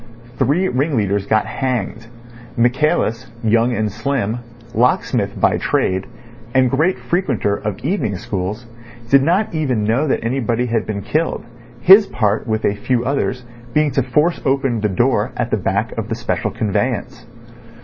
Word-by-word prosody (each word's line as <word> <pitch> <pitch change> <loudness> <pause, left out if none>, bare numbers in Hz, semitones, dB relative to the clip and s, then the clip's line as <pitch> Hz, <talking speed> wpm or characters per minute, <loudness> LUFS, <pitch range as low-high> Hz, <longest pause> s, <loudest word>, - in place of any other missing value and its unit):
Three 175 +7 +2
ring 140 -1 0
leaders 100 -1 0
got 110 -1 +2
hanged. 115 -3 -3 0.5
Michaelis, 125 0 +1
young 115 +2 +3
and 110 -2 -1
slim, 120 -1 -2 0.3
locksmith 120 +2 +1
by - - +3
trade, 95 0 0 0.5
and 130 -2 +4
great 160 +7 +2
frequenter 175 - 0
of 105 -1 -4
evening 150 - 0
schools, 100 +5 -4 0.5
did 140 0 +7
not 175 +9 +1
even 130 -9 0
know 115 +8 +1
that 135 - 0
anybody 120 0 0
had 115 -2 -1
been 100 -2 -3
killed, 155 +6 -1 0.4
his 195 - +8
part 105 -3 0
with 110 -1 -1
a - - +2
few 120 +4 -1
others 130 -1 -1 0.3
being 150 -1 +3
to 135 - +1
force 150 +7 +1
open 135 -4 0
the 105 - +1
door 95 - +1
at - - -2
the - - +2
back - - -1
of - - -5
the - - -1
special - - -2
conveyance. 105 -4 -2
125 Hz, 155 wpm, -19 LUFS, 110-140 Hz, 0.5 s, his